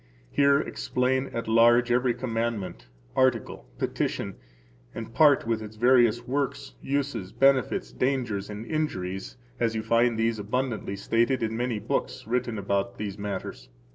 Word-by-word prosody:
Here 140 0 +4
explain 130 -1 -1
at 115 - -5
large 120 +2 +5
every 125 0 +2
commandment, 115 - -3 0.3
[article,] 125 - +1
petition, - - -2 0.6
and 115 0 -7
part 145 -5 +5
with 115 -1 0
its 110 0 -8
various 120 0 +4
works, 135 - -2
uses, 135 -9 -2
benefits, 135 -1 +2
dangers, 120 -7 -1
and 105 +2 -6
injuries, 95 - -3 0.2
as 115 -1 +1
you 110 - -2
find 115 +1 +2
these 115 0 0
abundantly 110 -1 -2
stated 115 +5 +1
in 110 0 -1
many 120 -1 -1
books - - -3
written 120 0 -1
about 100 0 -1
these 105 -1 -5
matters. 95 -12 -5
115 Hz, 140 wpm, -27 LUFS, 105-125 Hz, 0.6 s, large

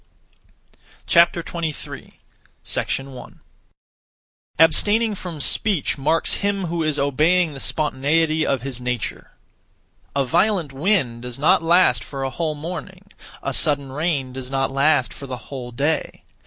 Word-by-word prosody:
23. 170 -2 0 0.8
1. 135 -2 -11 1.2
Abstaining 210 +8 +4
from 180 -5 -7
speech 195 - +2
marks 150 +4 +1
him 200 -2 -1
who 170 0 -2
is 155 -2 0
obeying 155 +5 +2
the 135 - -8
spontaneity 155 +2 +1
of 135 -5 0
his 130 -3 -5
nature. 125 -3 -4 0.9
A 140 -1 +2
violent 175 0 +1
wind 135 - 0
does 125 -1 -7
not 145 +4 +4
last 165 - +3
for 135 -1 -6
a 135 - -2
whole 155 +3 -2
morning; 180 +5 -8 0.3
a - - -2
sudden 140 -4 +1
rain 140 -3 -1
does 130 -1 -6
not 135 0 -1
last 140 -1 +2
for 140 - -9
the 130 -1 -5
whole 125 -3 -6
day. 145 +6 -2
150 Hz, 130 wpm, -22 LUFS, 135-170 Hz, 1.2 s, Abstaining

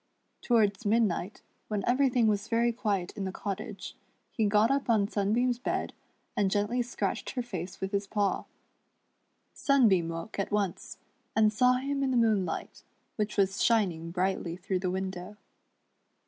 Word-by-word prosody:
Towards 220 -3 +2
mid 225 +2 +3
night, 195 0 -2 0.2
when 210 -2 -2
everything 250 -2 +3
was 210 -1 +1
very 235 0 +2
quiet 205 -6 -1
in 205 - -4
the 190 - -3
cottage, 200 0 -6 0.4
he 220 -3 +1
got 210 +4 +4
up 275 -2 0
on 210 -3 +3
Sunbeam's 230 +5 +1
bed, - - -2 0.4
and 200 -2 +2
gently 205 +5 +1
scratched 240 0 -3
her 250 - -1
face 185 -6 -6
with 190 0 -3
his 200 -1 -1
paw. 205 -1 0 1.1
Sunbeam 215 - +3
woke 165 +5 -6
at 195 - -2
once, 200 -4 -2 0.4
and 215 -1 +4
saw 250 +3 +4
him 275 +2 -1
in 270 - +1
the 255 - +1
moonlight, 210 -7 0 0.3
which 210 -1 -2
was 195 0 +2
shining 180 -8 +2
brightly 180 -1 -1
through 185 0 -2
the 185 0 -1
window. 190 +1 -4
210 Hz, 155 wpm, -29 LUFS, 190-235 Hz, 1.1 s, got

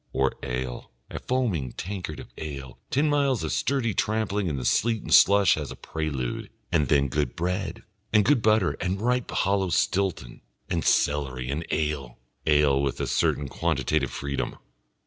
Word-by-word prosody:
Or 65 0 +1
ale, 60 0 -4 0.2
a - - -4
foaming 105 - -1
tankard 90 -4 -5
of - - -11
ale, 70 -5 -7
ten 145 +4 +2
miles 140 -4 +2
of - - -2
sturdy 130 -6 0
tramping 105 -2 0
in 75 -4 -2
the 65 - -4
sleet 115 - +2
and - - -1
slush 100 0 +6
as 75 -4 -4
a - - -7
prelude, 70 -6 -4 0.2
and 80 -5 +2
then 70 +1 +3
good 70 -1 -1
bread 90 +3 -2 0.3
and 105 -1 +4
good 145 -5 +4
butter 110 -4 +3
and 95 +1 -1
a - - -6
ripe 125 0 +1
hollow 95 -1 +1
Stilton 90 -9 0 0.3
and - - 0
celery 65 -3 +1
and 80 +4 -3
ale 75 -5 -2 0.3
ale 75 -2 +4
with 70 -2 -1
a - - 0
certain 70 - +1
quantitative 70 -2 0
freedom. 70 0 -3
80 Hz, 165 wpm, -26 LUFS, 70-105 Hz, 0.3 s, slush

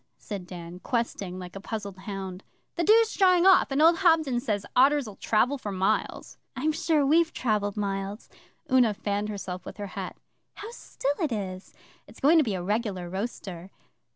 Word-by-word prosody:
said 195 -4 -7
Dan, 175 -1 -9
questing 200 -5 -2
like 180 0 -9
a - - -5
puzzled 205 -2 -5
hound. 190 -1 -7 0.3
'The 340 - -1
dew's 450 +1 +5
drying 365 -2 +4
off, 380 -1 +6
and 280 +2 +2
old 335 +1 +6
Hobden 320 -9 +3
says 210 -4 -2
otters'll 260 -5 +3
travel 250 +6 +1
for 210 - -5
miles.' 190 0 -1 0.2
'I'm 295 +5 0
sure 310 -2 +1
we've 325 +3 +3
travelled 210 -4 -1
miles.' 200 +1 -3 0.4
Una 245 -5 +4
fanned 205 0 -2
herself 185 -3 -5
with - - -9
her 205 - -5
hat. - - -6 0.4
'How 430 +3 -8
still 285 - -3
it 310 -5 0
is! 190 -4 -5 0.3
It's - - -15
going 320 +4 +5
to - - +4
be 215 -7 -2
a 180 - -4
regular 200 -3 -2
roaster. 190 -3 -5
215 Hz, 175 wpm, -27 LUFS, 195-290 Hz, 0.4 s, off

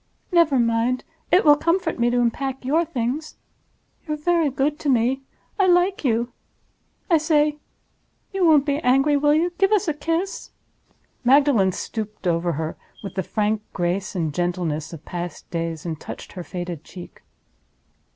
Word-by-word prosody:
Never 335 -6 +4
mind! 235 +1 +1 0.3
It 360 - +5
will 295 -1 +8
comfort 335 0 0
me 240 0 +3
to 245 0 +1
unpack 260 +2 -1
your 315 +6 +2
Things. 275 +1 -3 0.7
You're 305 0 -2
very 330 0 +2
good 285 +3 -1
to 290 - -2
me. 255 +1 +2 0.4
I 385 - +4
like 360 +1 +3
you. 235 -2 +1 0.8
I 335 -4 +4
say—you 300 +5 -2
won't 305 -4 +5
be 285 0 0
angry, 270 +2 +3
will 295 +1 +3
you? 340 +3 +1
Give 390 +1 +3
us 420 -2 +2
a 310 - +1
kiss." 330 +6 -3 0.7
Magdalen 255 -7 +4
stooped 215 +2 -6
over 170 0 +1
her 160 +2 -4 0.3
with 195 - -6
the 190 - -1
frank 210 +3 -1
grace 180 +3 -2
and 160 -4 -1
gentleness 170 -3 -2
of 165 -2 -10
past 175 -1 -6
days, 165 -2 -3
and 160 -3 -4
touched - - -9
her 180 - -6
faded 175 -3 -6
cheek. 180 0 -12
255 Hz, 155 wpm, -23 LUFS, 185-305 Hz, 0.8 s, will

